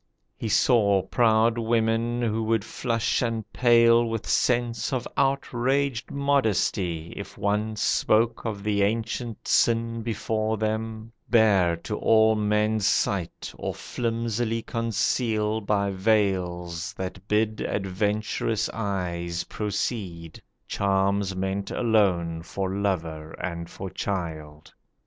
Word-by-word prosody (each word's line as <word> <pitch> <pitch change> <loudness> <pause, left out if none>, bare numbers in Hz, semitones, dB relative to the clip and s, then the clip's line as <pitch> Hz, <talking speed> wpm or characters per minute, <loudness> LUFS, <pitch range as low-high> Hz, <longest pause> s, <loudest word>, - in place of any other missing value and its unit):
He 110 - -4
saw 105 -3 +4
proud 115 -1 +3
women 115 +1 +1
who 110 -1 0
would 110 -2 +1
flush 115 -2 -1
and 115 -2 -1
pale 115 -1 +5
With 115 -2 -3
sense 120 0 +1
of 130 -2 -2
outraged 135 -1 0
modesty 105 - 0
if 100 0 -8
one 105 +2 0
Spoke 115 +2 +2
of 105 -3 -4
the 105 -1 +1
ancient 115 +2 -2
sin 115 0 +2
before 110 -1 -1
them, 110 +1 -3 0.2
bare 100 -7 +4
To 105 - -3
all 110 0 +5
men's 105 0 +1
sight, 95 -5 -1
or - - -3
flimsily 115 -1 -2
conceal 110 -1 0
By 100 -1 0
veils 95 -4 0
that 95 +1 -6
bid 110 0 +1
adventurous 105 +2 -1
eyes 85 -5 -2
proceed, 95 -5 -4 0.3
Charms 100 0 +1
meant 95 +1 -2
alone 90 -8 +1
for 95 +2 -3
lover 80 -6 -2
and 85 -1 -5
for 95 - -7
child. 80 -6 -5
110 Hz, 110 wpm, -26 LUFS, 95-115 Hz, 0.3 s, pale